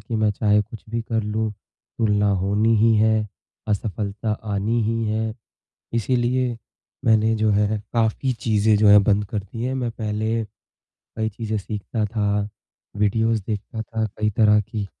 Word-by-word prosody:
कि 110 +2 -4
मैं 110 -1 +2
चाहे 105 +1 +2
कुछ 110 +1 -12
भी 115 - -1
कर 110 -1 -1
लूँ 110 +1 -1 0.5
तुलना 105 -2 +2
होनी 105 +3 +2
ही 115 +1 +4
है, 110 0 +3 0.4
असफलता 105 +1 -2 0.2
आनी 110 +4 0
ही 115 +1 0
है 110 0 -1 0.6
इसीलिए 120 +1 0 0.5
मैंने 110 0 +4
जो 110 0 +1
है 105 +1 +1
काफ़ी 115 +3 +1
चीज़ें 110 -1 +2
जो 105 0 +4
हैं 100 0 +8
बंद 105 0 +2
कर 105 +1 -3
दी 100 +4 -7
हैं। 130 +1 -1
मैं 125 -3 -1
पहले 110 +1 -2 0.7
कई 110 0 -1
चीज़ें 110 0 -3
सीखता 105 +2 -3
था, 105 -1 -1 0.5
वीडियोज़ 110 +1 +1
देखता 110 +1 -4
था 110 0 -2
कई 105 0 +1
तरह 105 -1 +5
की 105 0 -5
110 Hz, 155 wpm, -23 LUFS, 105-115 Hz, 0.7 s, हैं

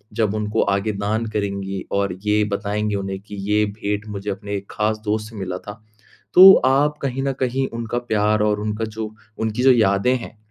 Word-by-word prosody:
जब 110 -3 +1
उनको 105 +1 0
आगे 100 +2 -1
दान 105 +3 -2
करेंगी 100 -2 -3
और 100 -1 0
ये 105 0 +3
बताएँगी 105 +1 -1
उन्हें 95 -1 -4
कि 105 0 -10
ये 105 0 +3
भेंट 105 0 -3
मुझे 100 0 -5
अपने 100 +1 -4
खास 110 0 -1
दोस्त 110 +1 -1
से 115 - -13
मिला 95 -2 -4
था, 105 +3 -10 0.5
तो 190 +1 +11
आप 145 +3 +2
कहीं 135 -1 -2
न 135 -1 0
कहीं 130 +1 0
उनका 115 +1 -3
प्यार 105 -1 +2
और 105 -1 +1
उनका 105 +1 -2
जो 110 0 -6 0.3
उनकी 110 +2 -1
जो 130 - +7
यादें 110 +1 +3
हैं, 115 -2 -10
105 Hz, 190 wpm, -21 LUFS, 100-115 Hz, 0.5 s, तो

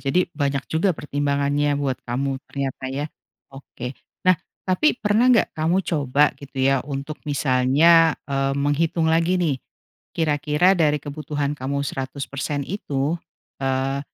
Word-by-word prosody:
jadi 175 +6 +2
banyak 140 -3 -1
juga 170 +1 +2
pertimbangannya 145 0 0
buat 140 -3 -2
kamu 135 +2 -1
ternyata 135 -1 -4
ya. 140 +3 -3 0.5
Oke. 135 -2 -8 0.3
Nah, 185 - +7 0.3
tapi 195 +10 +2
pernah 220 +3 +2
nggak 240 -3 +4
kamu 170 +4 +1
coba 145 -2 +2
gitu 140 -1 -13
ya, 135 0 +3
untuk 140 +2 -6
misalnya, 145 +5 +4
eee, 135 0 -1
menghitung 155 +4 +1
lagi 170 +3 +2
nih, 160 -7 +1 0.6
kira-kira 150 +3 +2
dari 150 -3 +3
kebutuhan 145 0 -3
kamu 140 +2 -2
100% 140 +1 -4
itu, 145 -5 -2 0.5
eee, 135 +1 0
145 Hz, 125 wpm, -23 LUFS, 135-160 Hz, 0.6 s, Nah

